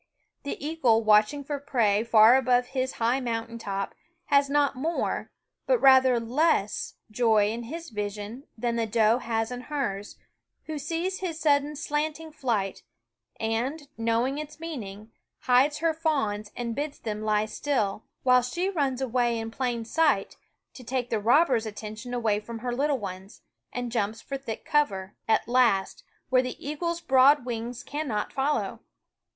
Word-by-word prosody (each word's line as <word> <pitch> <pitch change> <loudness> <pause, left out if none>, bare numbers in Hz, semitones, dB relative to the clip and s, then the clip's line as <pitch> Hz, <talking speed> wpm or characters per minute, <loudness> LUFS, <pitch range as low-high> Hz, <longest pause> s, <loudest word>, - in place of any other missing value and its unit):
The 280 - -4
eagle 250 -9 +2
watch 210 +1 +5
ing 290 -1 -6
for 285 +1 -4
prey 225 -7 +1
far 230 +1 +7
above 250 -2 +2
his 260 -1 -1
high 235 +3 +1
mountain 230 -2 -3
top 195 -2 -3 0.3
has 280 -1 +3
not 285 -1 +2
more, 320 +6 -2 0.4
but - - +4
rather 260 - +6
less, 235 -2 0 0.2
joy 215 -2 +3
in 235 +1 -5
his 330 +4 -7
vision 210 +4 -5
than 235 +1 -1
the 225 -1 0
doe 220 +2 +3
has 225 -1 -2
in 250 0 -5
hers, 215 -9 -4 0.5
who 310 -1 -5
sees 335 +6 -2
his 340 -4 -4
sudden 290 -1 +2
slanting 305 +2 -3
flight 220 -10 -2 0.6
and, 255 +7 -2
knowing 230 +5 0
its 305 +1 -8
meaning, 220 -10 -7 0.3
hides 265 +4 +3
her 330 -1 +2
fawns 245 -11 -1
and 235 -1 -3
bids 290 0 -3
them 215 -2 -5
lie 215 0 +1
still; 220 -4 -1 0.2
while 250 -1 +5
she 345 +11 -2
runs 275 -7 -1
away 240 -2 +1
in 225 0 -4
plain 240 -2 -2
sight, 290 -5 +1 0.4
to 255 - -11
take 245 0 -3
the 225 - +1
robber's 240 0 +3
attention 215 +3 -7
away 225 -4 +1
from 230 +2 -8
her 245 +1 -3
little 280 +2 +1
ones, 195 -2 -8 0.3
and 245 -1 -4
jumps 220 -1 -1
for 275 - -6
thick 270 -5 -6
cover, 210 -12 0
at 220 -1 +2
last, 235 -6 +2 0.3
where 255 0 +4
the 255 -1 -5
eagle's 335 +3 -2
broad 265 -1 +5
wings 240 0 -4
cannot 280 -8 -3
follow. 275 +3 -1
245 Hz, 155 wpm, -27 LUFS, 220-285 Hz, 0.6 s, far